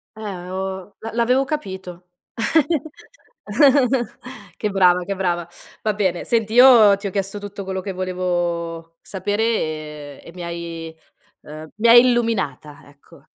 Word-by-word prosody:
Eh 220 - -11 0.3
oh, 190 +1 -5
l'avevo 225 0 -7
l'avevo 250 +3 +2
capito, 190 - -6 2.5
che 210 - -2
brava, 180 -2 +3
che 200 +1 -3
brava. 175 -3 -1 0.4
Va 215 -1 +1
bene, 185 -4 -1
senti, 225 -2 0
io 235 -5 +7
ti 200 +1 -5
ho - - -5
chiesto 195 +1 -3
tutto 205 0 -7
quello 190 0 -4
che 195 0 -5
volevo 175 -2 -3
sapere, 205 +2 -3
e 155 -9 -3
e 170 - -11
mi 180 -1 -8
hai, 170 -1 -7 0.5
ehm, 155 +1 -10
mi 220 +3 +1
hai 240 +1 +9
illuminata, 225 - -1
ecco. 145 0 -20
190 Hz, 135 wpm, -21 LUFS, 170-210 Hz, 2.5 s, hai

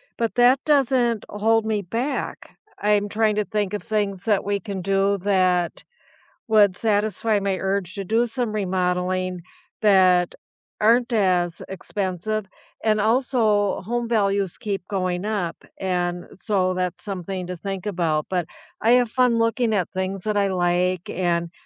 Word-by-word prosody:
but 230 -1 -2
that 250 +2 +5
doesn't 255 -6 +2
hold 220 +2 +1
me 215 -2 0
back. 235 +9 -4 0.2
I'm 205 0 +2
trying 215 0 +1
to 210 - +1
think 210 -1 -2
of 205 - -2
things 205 -3 -2
that 210 -3 +2
we 200 0 -1
can 190 -1 -6
do 195 +1 +2
that 185 -4 +1 0.6
would 210 -4 +5
satisfy 215 0 +1
my 195 -1 -1
urge 195 -1 -2
to 200 - -4
do 225 +5 +1
some 235 -1 -2
remodeling 185 -2 -1 0.4
that 185 -4 +4 0.4
aren't 235 +3 +3
as 180 -5 +1
expensive. 195 +2 -3 0.4
And 215 -1 +2
also 220 -3 +2
home 235 +3 -3
values 200 -4 +1
keep 200 -2 -3
going 185 -2 -2
up, 205 -6 -2 0.2
and 175 -2 -1
so 190 -2 0
that's 180 -1 -3
something 190 -2 -4
to 180 - -5
think 195 +1 -5
about. 165 -6 0
But 180 -3 0 0.3
I 230 +2 +4
have 245 -2 +3
fun 250 -2 +3
looking 230 0 +1
at 185 -4 -1
things 190 0 -3
that 215 -1 -1
I 200 -1 +2
like 180 -1 0
and 170 -2 -1
200 Hz, 150 wpm, -23 LUFS, 185-220 Hz, 0.6 s, that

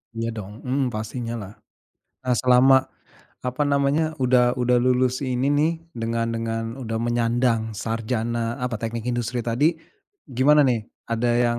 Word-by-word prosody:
Iya 115 0 -2
dong, 105 -2 -7
mhm, 130 +1 0
pastinya 115 +2 -4
lah. 105 -2 -7 0.7
Nah 125 -1 +1
selama, 130 +1 +6 0.7
apa 125 +3 -2
namanya, 145 +3 +1
udah 125 -1 +4
udah 125 -1 +2
lulus 125 0 +2
ini 130 +2 0
nih, 150 +3 +3 0.2
dengan 115 -3 -2
dengan 115 0 -2 0.2
udah 115 -3 -3
menyandang 120 -1 +1
sarjana, 115 +2 -2
apa, 120 -3 -2
teknik 115 0 -4
industri 120 0 -2
tadi, 135 +9 +2 0.6
gimana 145 +4 +5
nih? 120 -5 +1 0.2
Ada 115 +1 +1
yang 120 0 +1
120 Hz, 140 wpm, -23 LUFS, 115-130 Hz, 0.7 s, selama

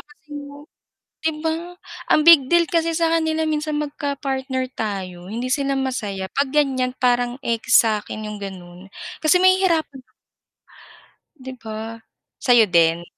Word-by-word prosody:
kasing 295 -1 -11 0.8
'di 320 - +1
ba? 335 +2 -3 0.4
Ang - - +5
big 315 -6 +7
deal 345 0 +5
kasi 330 -1 +1
sa 330 -1 +1
kanila 320 -1 +1
minsan 305 0 -2
magka-partner 275 -3 -3
tayo, 185 -4 -5
hindi 235 +5 -4
sila 275 -1 0
masaya. 215 -8 -3
'Pag 280 -1 0
ganyan 260 -3 +1
parang 245 -1 +1
ekis 235 +2 +4
sakin 215 0 -3
yung 210 0 -7
ganon 185 -1 -9 0.3
kasi 310 +3 +4
mahihirapan 365 -7 +2 1.4
'Di 260 0 -8
ba. 220 +1 -7 0.4
Sayo 240 -3 +5
din? 170 -1 +3
265 Hz, 125 wpm, -21 LUFS, 220-310 Hz, 1.4 s, big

